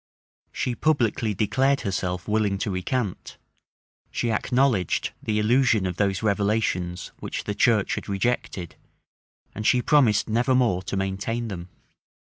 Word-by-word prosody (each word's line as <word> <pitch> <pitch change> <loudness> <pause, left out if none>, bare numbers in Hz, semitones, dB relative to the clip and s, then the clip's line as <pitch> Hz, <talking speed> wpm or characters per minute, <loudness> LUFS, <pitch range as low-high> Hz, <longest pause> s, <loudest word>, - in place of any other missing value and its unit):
She 125 - -2
publicly 120 -7 +1
declared 135 +7 +2
herself 90 -3 -3
willing 105 -2 +1
to 100 - -2
recant: 95 +2 -3 0.7
she 120 - -1
acknowledged 120 -4 +1
the 105 -1 -1
illusion 115 -1 +3
of 90 -1 -3
those 100 0 0
revelations 100 -4 0
which - - -5
the 105 - -3
church 110 -1 +2
had - - -5
rejected; 100 -4 -2 0.8
and 110 - -5
she 125 - +4
promised 125 -9 +4
never 120 +4 +2
more 115 -8 +2
to 95 - -4
maintain 100 +5 -2
them. 90 -2 -7
105 Hz, 130 wpm, -25 LUFS, 95-120 Hz, 0.8 s, she